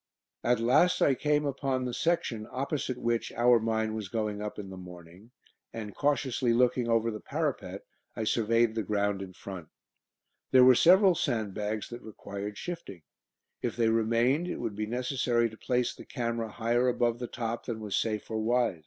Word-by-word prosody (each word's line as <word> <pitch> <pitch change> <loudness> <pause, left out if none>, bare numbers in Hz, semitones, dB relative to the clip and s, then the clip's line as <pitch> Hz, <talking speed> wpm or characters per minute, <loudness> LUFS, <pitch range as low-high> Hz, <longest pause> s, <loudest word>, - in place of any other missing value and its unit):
At 120 -1 +2
last 125 +10 +4
I 140 - +5
came 150 +2 +1
upon 135 -2 -1
the 125 - -3
section 120 -9 -1
opposite 135 -1 -2
which 120 -1 -1
our 120 0 +5
mine 110 -1 -1
was 110 -3 -4
going 105 -1 -2
up 105 0 -5
in 95 -2 -7
the - - -7
morning, 90 +3 -12 0.4
and 105 -3 -6
cautiously 130 -4 +1
looking 125 0 +2
over 115 0 +2
the 105 - -6
parapet - - -3 0.3
I 110 - -2
surveyed 115 +1 +2
the 110 - -1
ground 100 -1 0
in 95 -1 -8
front. 95 -3 -8 0.8
There 130 -1 +7
were 130 - +9
several 185 - +6
sandbags 105 - -2
that 120 +1 -8
required 100 -1 -7
shifting. 100 - -7 0.6
If - - -2
they 115 -2 +2
remained 115 +8 +2
it - - -3
would 115 -4 -4
be 105 +1 -3
necessary 125 -1 0
to - - -11
place 125 +1 0
the - - -11
camera 115 -3 -3
higher 120 +3 +1
above 120 -1 +1
the 120 - -4
top 115 -1 -4
than 115 -3 -3
was 105 -2 -3
safe 110 -1 -1
or 110 - -1
wise. 120 -5 +1
115 Hz, 180 wpm, -29 LUFS, 105-125 Hz, 0.8 s, were